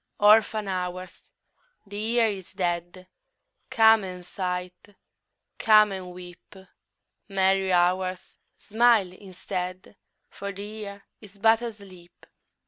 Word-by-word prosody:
Orphan 215 0 +4
Hours, 185 -1 -5 0.6
the 205 0 -11
Year 230 +2 +2
is 195 -4 -4
dead, 175 0 -3 0.6
Come 220 -1 +5
and 180 -1 -8
sigh, 180 -1 -4 0.9
come 215 -2 +5
and 185 -2 -7
weep! 180 +1 -13 0.7
Merry 190 -1 +1
Hours, 185 +1 0 0.2
smile 220 -3 +2
instead, 185 0 -7 0.3
For 200 0 -7
the 200 +1 -8
Year 205 -2 -8 0.2
is 205 -2 -15
but 225 +2 +3
asleep. 200 -7 -11
195 Hz, 105 wpm, -25 LUFS, 180-210 Hz, 0.9 s, Come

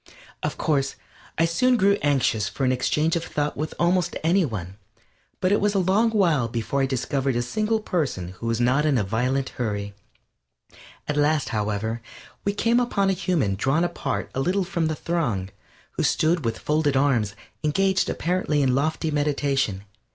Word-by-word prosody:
Of - - -3
course, 135 -3 0 0.4
I 165 - +4
soon 245 +10 +2
grew 200 -1 +4
anxious 130 -7 +1
for 135 - -2
an 130 - +3
exchange 150 +5 +1
of 165 - -1
thought 150 -3 -2
with 155 +2 -4
almost 175 0 +1
any 180 +4 +3
one, 95 - -5 0.6
but 185 - +1
it 205 - +3
was 205 0 +1
a - - +3
long 195 +5 +3
while 170 - +2
before 115 +4 -2
I 135 - +2
discovered 135 0 -1
a 120 - +1
single 215 - 0
person 150 - -2
who 95 +5 -7
was 115 0 0
not 130 +4 +3
in 150 -4 +2
a 110 - +1
violent 125 +7 0
hurry. 100 -4 -3 1.1
At 150 - -1
last, 150 0 +2
however, 110 +1 -2 0.4
we 200 - +1
came 230 +3 +3
upon 200 -5 +1
a - - +2
human 170 - 0
drawn 135 - +1
apart 175 0 -3
a - - -2
little 185 +7 +1
from 175 -3 -1
the 155 - -1
throng, 125 - -1 0.4
who - - -3
stood 160 -2 +2
with 115 -1 -1
folded 150 -2 +1
arms, 120 -7 +1 0.3
engaged 190 +5 +2
apparently 165 -4 0
in 130 -2 +2
lofty 155 +3 0
meditation. 140 -8 0
145 Hz, 175 wpm, -24 LUFS, 120-175 Hz, 1.1 s, I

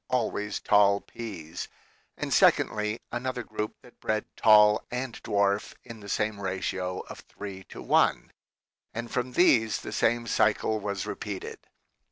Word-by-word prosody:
always 110 -4 -1
tall 100 -1 +4
peas; 90 -10 -7 0.5
and - - -2
secondly, 105 +1 +3
another 125 0 -3
group 105 0 -4
that 125 - -18
bred 110 -1 -1
tall 105 -1 +6
and 125 -1 -4
dwarf 100 0 0
in 115 -2 -10
the 100 -1 -10
same 105 0 -1
ratio 95 -1 -3
of - - -10
three 95 -2 -9
to - - -11
one; - - +2 0.6
and 115 0 -5
from 125 0 -2
these 115 -10 +4
the - - -7
same 120 +1 +1
cycle 110 -1 +1
was 100 -2 -3
repeated. - - -6
105 Hz, 140 wpm, -28 LUFS, 100-115 Hz, 0.6 s, tall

